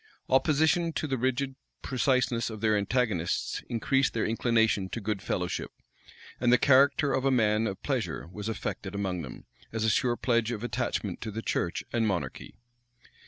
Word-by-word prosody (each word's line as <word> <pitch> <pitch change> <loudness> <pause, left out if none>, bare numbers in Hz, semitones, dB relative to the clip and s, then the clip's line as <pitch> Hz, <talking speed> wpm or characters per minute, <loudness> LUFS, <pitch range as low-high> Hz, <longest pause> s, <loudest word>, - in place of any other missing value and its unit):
Opposition 160 +5 +3
to 155 - -2
the 135 -3 -1
rigid 130 +2 0 0.3
preciseness 125 -3 +1
of 110 -1 -7
their 110 -1 +2
antagonists 105 -4 0
increased 135 +3 +1
their 110 - +1
inclination 110 -4 +2
to 115 - -4
good 105 -2 -2
fellow 90 -2 -1
ship; 90 - -4 0.7
and 120 -1 +3
the 125 - +7
character 140 +2 +4
of 130 - 0
a 135 - +3
man 110 -3 +2
of 95 - -6
pleasure - - -2
was 105 +2 -5
affected 100 -2 -4
among 95 -3 -2
them, 65 - -9 0.3
as 110 -1 -2
a 110 - +3
sure 120 +3 +2
pledge 115 -2 +1
of 115 -1 -4
attachment 120 - -2
to 110 - -4
the 110 +2 -5
church 85 - -1
and 115 -2 +2
monarchy. 95 -4 -3
115 Hz, 170 wpm, -28 LUFS, 105-130 Hz, 0.7 s, the